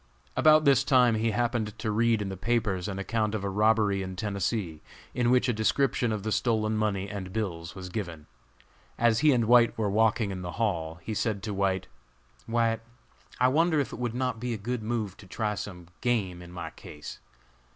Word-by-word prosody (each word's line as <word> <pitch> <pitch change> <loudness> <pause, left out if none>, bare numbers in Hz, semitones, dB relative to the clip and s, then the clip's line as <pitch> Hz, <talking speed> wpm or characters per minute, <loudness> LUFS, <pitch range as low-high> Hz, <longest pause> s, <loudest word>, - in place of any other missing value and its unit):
About 155 0 +5
this 135 -1 +5
time 125 -3 +4
he 110 +1 +1
happened 115 -2 -1
to 110 - -2
read 115 0 +2
in 95 - -4
the 95 - -4
papers 100 -3 0
an 100 -2 -4
account 110 +2 -1
of 105 - -3
a 100 - -1
robbery 105 -1 +3
in 95 -1 -5
Tennessee, 100 -4 -2 0.3
in 120 -1 +1
which 125 0 +4
a 125 - +2
description 120 +2 +1
of 105 -2 -3
the 110 - -2
stolen 110 -2 +1
money 105 -2 0
and 100 -3 -6
bills 90 -6 -4
was 95 -1 -7
given. 85 -7 -5 0.7
As 115 -1 +3
he 150 0 +5
and 120 -4 +2
White 120 0 +5
were 105 -3 0
walking 110 0 +2
in 95 -1 -5
the 90 -1 -5
hall, 85 -8 -1
he 110 - -4
said 105 -2 -1
to 105 -1 -3
White: 95 -1 0 0.6
"White, 115 -1 +1 0.6
I 125 - +5
wonder 160 +3 +3
if 140 - -2
it - - -7
would 120 -1 -2
not 125 -2 -1
be 120 0 -2
a - - -5
good 120 +3 -3
move 110 -4 -3
to 95 - -14
try 105 +3 -2
some 90 -3 -7 0.2
game 100 -8 0
in 90 0 -11
my 90 - -6
case? 75 0 -10
110 Hz, 205 wpm, -28 LUFS, 95-120 Hz, 0.7 s, About